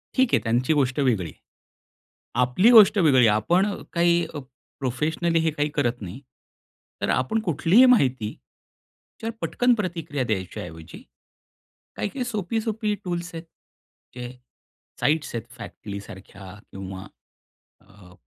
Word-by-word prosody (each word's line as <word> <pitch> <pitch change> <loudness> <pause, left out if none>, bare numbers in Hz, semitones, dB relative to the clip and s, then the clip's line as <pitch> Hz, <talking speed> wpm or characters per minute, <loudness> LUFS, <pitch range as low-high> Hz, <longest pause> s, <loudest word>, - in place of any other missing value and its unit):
ठीक 260 -2 +3
आहे, - - +5
त्यांची 120 +6 +1
गोष्ट 135 -2 +1
वेगळी. 110 - +1 1.0
आपली 125 - +4
गोष्ट 215 -3 +8
वेगळी 135 -9 +5
आपण 110 - +3 0.3
काही 170 0 +2 0.5
प्रोफेशनली 155 +6 0
हे 160 - +1
काही 150 -1 -1
करत 120 -4 0
नाही. 100 +7 -7 0.8
तर - - 0
आपण 130 +13 +1
कुठलीही 185 - +4
माहिती, 130 - +3 0.9
त्याच्यावर 225 0 -5
पटकन 245 0 +2
प्रतिक्रिया 165 - -3
द्यायच्या 95 -6 -3
ऐवजी, 80 -1 -11 0.9
काही-काही 255 +5 -3
सोपी-सोपी 220 0 -2
टूल्स 175 -1 -4
आहेत, 165 - -7 0.7
जे 125 -1 -6 0.7
साईट्स 150 -3 0
आहेत 115 0 -4
फॅक्टली 100 -3 -8
सारख्या 95 0 -12 0.2
किंवा 95 0 -8 0.8
अ, 95 -2 -18
145 Hz, 115 wpm, -24 LUFS, 110-185 Hz, 1.0 s, गोष्ट